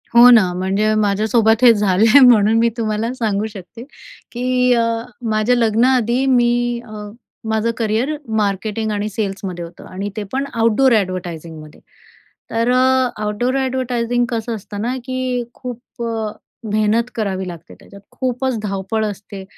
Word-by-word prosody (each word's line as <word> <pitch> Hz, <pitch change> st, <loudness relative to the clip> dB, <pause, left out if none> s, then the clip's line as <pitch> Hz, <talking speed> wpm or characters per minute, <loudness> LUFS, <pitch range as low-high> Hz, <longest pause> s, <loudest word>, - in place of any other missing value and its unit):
हो 240 Hz, +1 st, +9 dB
ना, 215 Hz, -7 st, +6 dB
म्हणजे 195 Hz, +4 st, 0 dB
माझ्यासोबत 215 Hz, +2 st, +2 dB
हे 240 Hz, -2 st, +8 dB
झालंय 210 Hz, +4 st, +4 dB
म्हणून 225 Hz, -3 st, +6 dB
मी 235 Hz, 0 st, +3 dB
तुम्हाला 220 Hz, +1 st, -2 dB
सांगू 215 Hz, -5 st, -1 dB
शकते, 200 Hz, +4 st, -10 dB, 0.5 s
की 250 Hz, +1 st, +1 dB
अ, 235 Hz, -1 st, +2 dB, 0.5 s
माझ्या 215 Hz, +3 st, +2 dB
लग्नाआधी 240 Hz, +2 st, +2 dB
मी 240 Hz, -2 st, +2 dB
अ, 210 Hz, -2 st, -8 dB, 0.4 s
माझं 220 Hz, +1 st, 0 dB
करियर 230 Hz, +6 st, 0 dB, 0.2 s
मार्केटिंग 215 Hz, +1 st, -1 dB
आणि 210 Hz, 0 st, -2 dB
सेल्समध्ये 195 Hz, -4 st, -4 dB
होतं 170 Hz, +1 st, -13 dB
आणि 195 Hz, +2 st, -4 dB
ते 215 Hz, -, -2 dB
पण 270 Hz, +1 st, -1 dB
आउटडोअर 230 Hz, +3 st, +3 dB
एडव्हर्टायझिंगमध्ये. 170 Hz, -5 st, -5 dB, 0.7 s
तर 230 Hz, +2 st, +1 dB
अ, 260 Hz, 0 st, +3 dB, 0.2 s
आउटडोअर 210 Hz, +5 st, -1 dB
एडव्हर्टायझिंग 245 Hz, -2 st, -1 dB
कसं 230 Hz, -1 st, -3 dB
असतं 205 Hz, -1 st, -7 dB
ना, 245 Hz, +3 st, -1 dB
की 255 Hz, -1 st, -2 dB
खूप 245 Hz, 0 st, -9 dB
अ, 225 Hz, -2 st, -3 dB, 0.4 s
मेहनत 215 Hz, +2 st, +2 dB
करावी 190 Hz, -4 st, -2 dB
लागते 170 Hz, -2 st, -10 dB
त्याच्यात. 200 Hz, 0 st, -15 dB
खूपच 255 Hz, -1 st, -2 dB
धावपळ 195 Hz, +2 st, -2 dB
असते 200 Hz, -1 st, -7 dB
220 Hz, 140 wpm, -18 LUFS, 205-245 Hz, 0.7 s, हो